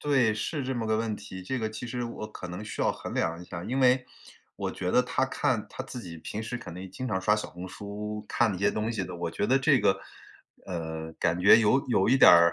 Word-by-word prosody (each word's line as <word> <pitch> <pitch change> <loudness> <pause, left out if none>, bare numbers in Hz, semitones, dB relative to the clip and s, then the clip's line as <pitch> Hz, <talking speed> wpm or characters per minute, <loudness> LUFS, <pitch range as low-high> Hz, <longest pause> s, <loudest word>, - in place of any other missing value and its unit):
对， 130 -7 +3
是 140 +7 -2
这 130 0 -2
么 115 -2 -2
个 110 0 +2
问 110 -1 -1
题， 100 -2 -9
这 130 +8 -3
个 110 -1 -2
其 110 +3 -6
实 125 0 -3
我 115 -2 -5
可 90 - -8
能 90 +4 -6
需 105 - -6
要 - - +3
衡 - - -6
量 85 +1 0
一 90 - -9
下， 85 -1 -7
因 130 +6 -2
为， 125 -1 +4 0.5
我 - - -2
觉 90 - -3
得 125 - +5
她 130 +1 0
看 125 -4 0
她 130 - -6
自 130 -2 -7
己 85 -5 -8
平 110 +7 -5
时 120 +2 -4
肯 90 -8 -9
定 95 +1 -8
经 130 +7 -5
常 95 -5 -1
刷 105 +2 +3
小 105 - -4
红 90 +1 -8
书， 105 +2 -6
看 120 -2 +2
那 95 - -3
些 100 +1 +3
东 110 +1 -1
西 105 -5 -2
的， 90 - -7
我 85 -1 -3
觉 100 - -1
得 135 - +4
这 140 0 +4
个， 95 -3 +2 0.7
呃， 80 -3 -5
感 85 +1 +1
觉 100 +4 +8
有 120 +5 +3
有 110 -4 +3
一 130 - +5
点 - - +8
儿 85 -1 +7
105 Hz, 285 characters per minute, -28 LUFS, 90-125 Hz, 0.7 s, 觉